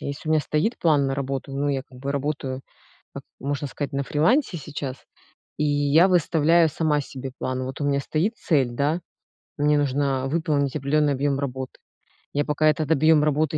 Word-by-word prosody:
Если 140 +3 -6
у - - +1
меня 155 - +4
стоит 155 +11 -1
план 150 -4 +3
на 135 - -1
работу, 135 0 -4
ну, 140 +1 -1
я 135 -2 -1
как 125 -2 -16
бы 140 +1 -3
работаю, 140 -2 -3 0.5
как, - - -8 0.2
можно 145 +1 -3
сказать, 140 0 -5
на 140 0 -1
фрилансе 175 - +2
сейчас 140 -3 -5 0.6
и 150 - 0
я 145 +4 +4
выставляю 165 -1 +4
сама 150 -1 +1
себе 130 -1 -7
план. 130 0 -2
Вот 130 +3 -6
у - - 0
меня 140 -1 +1
стоит 180 - -1
цель, 135 -7 +1
да, 145 +7 0 0.6
мне 150 0 +3
нужно 135 -1 0
выполнить 145 -3 0
определенный 145 +1 +1
объем 140 +1 0
работы. 130 -2 -5 0.5
Я 145 0 0
пока 155 +1 +1
этот 155 0 0
объем 155 0 +5
работы 155 +1 +1
145 Hz, 180 wpm, -24 LUFS, 135-155 Hz, 0.6 s, объем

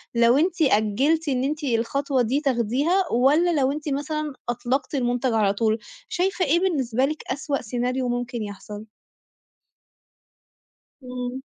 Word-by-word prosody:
لو 235 +2 +5
أنتِ 345 +3 +1
أجِّلتِ 270 +6 +2
إن 255 -2 0
أنتِ 300 +3 -2
الخطوة 265 +2 0
دي 255 +5 0
تاخديها 275 - +1
والّا 300 +7 +3
لو 265 +1 +2
أنتِ 300 +1 -4
مثلًا 300 +1 -2 0.2
أطلقتِ 250 +4 -1
المنتج 245 -1 0
على 210 -3 +2
طول، 220 +1 +1 0.3
شايفة 365 0 0
إيه 325 +4 +3
بالنسبة 265 -9 +1
لِك 305 +2 -4
أسوأ 280 +1 -2
سيناريو 250 +2 -2
ممكن 245 -1 -3
يحصل؟ 205 +1 -8 2.2
إمم. 250 +1 -5
260 Hz, 130 wpm, -24 LUFS, 240-300 Hz, 2.2 s, لو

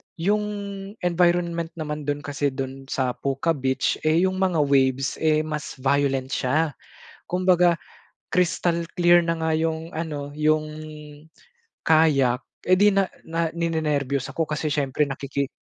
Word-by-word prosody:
yung 205 +5 +1 0.6
environment 175 -1 +1
naman 150 -2 -5
dun 145 0 -2
kasi 145 0 -1
dun 135 0 -5
sa 130 -2 0
Puka 135 +6 -1
Beach 130 -3 0
eh 165 +3 +4
yung 185 0 0
mga 180 -5 +2
waves 135 -1 +1
eh 155 -1 +2
mas 150 -1 -5
violent 135 0 0
siya 145 +5 +1 0.6
kumbaga 180 -1 +3 0.6
crystal 170 -1 +1
clear 175 -1 +5
na 165 - +1
nga 160 -1 +1
yung 160 0 -2
ano, 155 -4 -4
yung 155 0 +2 1.2
kayak 140 -6 +4 0.2
eh 185 - +6
di 205 +2 +5
na 195 -1 +2 0.2
na 165 0 -1
ninenerbyos 150 -5 -1
ako 140 +5 -1
kasi 155 0 -3
syempre 145 0 0
nakiki, 140 0 -3
155 Hz, 135 wpm, -24 LUFS, 140-170 Hz, 1.2 s, eh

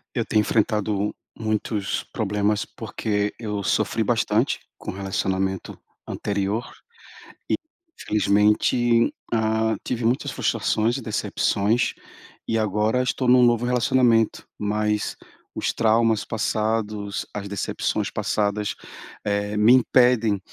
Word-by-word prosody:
Eu - - 0
tenho 110 - +2
enfrentado 105 -1 0 0.2
muitos 110 -2 -1
problemas, 105 +1 0
porque 105 -1 -3
eu 105 -3 -3
sofri - - +1
bastante - - +1 0.2
com - - -6
o - - -10
relacionamento 95 0 -2 0.3
anterior 100 +3 -2 1.2
e, - - -44
infelizmente, 105 +3 +3 0.2
ah, 110 0 +1
tive 120 -2 -3
muitas 120 +3 +1
frustrações 115 +3 0
e 135 - -6
decepções 110 0 0 0.5
e 115 - 0
agora 110 +3 +1
estou 130 +1 -1
num 125 0 +6
novo 120 0 +3
relacionamento. 120 -2 +2
Mas 105 0 -1 0.4
os - - -1
traumas 110 -1 +2
passados, 110 -2 -2
as 100 -1 -5
decepções 100 -1 -2
passadas, 105 0 -1 0.5
eh, 105 0 -1
me 110 +4 +6
impedem 125 -4 +4
110 Hz, 110 wpm, -23 LUFS, 105-115 Hz, 1.2 s, num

